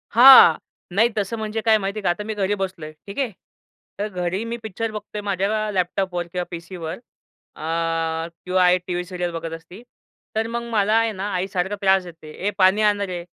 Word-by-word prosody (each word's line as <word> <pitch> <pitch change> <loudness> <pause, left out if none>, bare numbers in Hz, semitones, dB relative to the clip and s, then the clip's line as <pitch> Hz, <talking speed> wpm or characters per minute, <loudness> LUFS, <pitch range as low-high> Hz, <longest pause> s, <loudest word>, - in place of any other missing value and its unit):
हां. 260 +3 +10 0.4
नाही, 225 +4 +4
तसं 205 +3 -1
म्हणजे 220 0 -3
काय 220 -1 +6
माहिती 200 0 -3
आहे - - -9
का, - - +2
आता 175 +4 -1
मी 220 +1 -4
घरी 205 -1 0
बसलो 185 -4 -4
आहे, 155 - -9
ठीक 200 +6 -6
आहे. 260 -5 0 0.7
तर 205 - -1
घरी 185 0 -3
मी 230 +1 -4
पिक्चर 220 +1 -4
बघतो 210 -1 -6
आहे, - - -3
माझ्या 205 +2 0
लॅपटॉपवर 180 -1 -1
किंवा 180 0 -2
पीसीवर 170 -1 -6 0.6
अ, 165 0 -2 0.3
किंवा 185 - +5
आई, 180 0 +5
टीव्ही 180 -1 -2
सिरीयल 180 -1 -3
बघत 165 -1 -5
असती, 165 +5 -10 0.5
तर 220 +1 0
मग 235 +1 -3
मला 210 -1 +2
आहे 225 0 +2
ना, 190 -2 -6
आईसारखं 190 +1 -1
त्रास 190 -1 +4
देते 165 -3 -12 0.2
"ये 205 - +1
पाणी 190 +2 +4
आणं 205 -1 +2
रे, 180 -2 -5
190 Hz, 200 wpm, -22 LUFS, 175-215 Hz, 0.7 s, हां